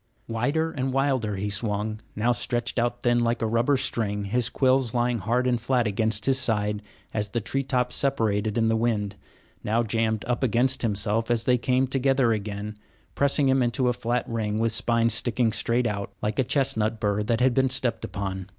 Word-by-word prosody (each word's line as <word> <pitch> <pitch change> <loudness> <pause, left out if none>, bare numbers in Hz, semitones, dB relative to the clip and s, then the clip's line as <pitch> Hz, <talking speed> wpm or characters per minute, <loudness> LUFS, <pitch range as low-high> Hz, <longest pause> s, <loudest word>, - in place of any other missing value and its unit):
Wider 140 +8 -1
and 130 -2 -2
wilder 130 -6 0
he 100 +2 -3
swung, 105 +1 -2 0.2
now 120 +3 +1
stretched 120 0 -1
out 120 +1 -1
thin, 120 0 +3
like 120 0 0
a - - -1
rubber 115 +5 +2
string, 105 -5 -1
his 120 +4 0
quills 130 -3 +1
lying 120 -1 +1
hard 120 +6 0
and 120 -2 +1
flat 125 0 +1
against 110 +1 0
his 135 -1 +3
sides 105 -4 0 0.3
as 105 -1 -1
the 120 - -1
tree 135 +5 -2
tops 125 -2 -1
separated 110 -5 0
in 115 - +2
the 115 0 +2
wind; 110 -3 -1 0.5
now 115 +3 +1
jammed 110 -1 -1
up 120 -1 -1
against 130 +1 +2
himself 105 +1 0
as 120 -1 +1
they 125 +1 +2
came 130 +2 +1
together 135 -2 +2
again, 105 0 -5 0.3
pressing 140 0 +2
him 130 0 +3
into 125 +1 +1
a - - +1
flat 120 +1 -2
ring 110 -2 -2
with 115 0 +1
spines 115 0 +2
sticking 115 0 +1
straight 115 +3 +1
out, 100 -3 -3
like 105 +5 -2
a - - +4
chestnut 115 -5 0
bur 105 -1 0
that 115 +2 0
has 130 +1 +4
been 130 +2 +2
stepped 125 -2 0
upon. 95 -1 -4
115 Hz, 195 wpm, -25 LUFS, 105-125 Hz, 0.5 s, a